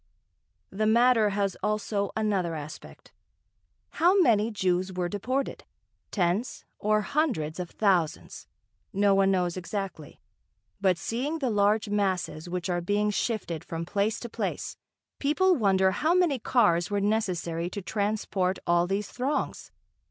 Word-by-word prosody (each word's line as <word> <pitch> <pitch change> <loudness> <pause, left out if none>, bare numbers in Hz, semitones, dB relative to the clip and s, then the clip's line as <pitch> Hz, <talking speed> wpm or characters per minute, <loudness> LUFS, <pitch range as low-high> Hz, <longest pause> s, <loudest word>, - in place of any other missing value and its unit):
The 215 +3 0
matter 230 -1 +4
has 200 -1 -1
also 210 -1 -1
another 195 -6 0
aspect. 150 0 -10 0.8
How 360 +4 +4
many 225 - +4
Jews 185 -3 0
were 180 -1 -2
deported 245 +8 -3 0.5
tens 195 +6 -1
or 215 0 +2
hundreds 210 - -1
of 180 -1 -4
thousands 185 -7 0 0.4
no 200 0 +3
one 195 0 +4
knows 180 -2 0
exactly; 185 -5 -5 0.6
but 185 -3 +3
seeing 260 - -2
the 265 -6 -1
large 210 +1 +2
masses 185 -5 -1
which 180 0 -3
are 175 -1 -1
being 205 +4 +1
shifted 200 -7 -2
from 165 0 -5
place 200 +4 0
to 240 - -5
place, 230 - -4 0.4
people 365 +7 +3
wonder 190 - +3
how 315 - +1
many 345 -8 +2
cars 190 -8 +2
were 205 -1 0
necessary 180 -5 -1
to 200 +1 -6
transport 200 -1 -1
all 175 0 +3
these 195 +2 -1
throngs. 265 +4 -2
200 Hz, 135 wpm, -27 LUFS, 180-220 Hz, 0.8 s, matter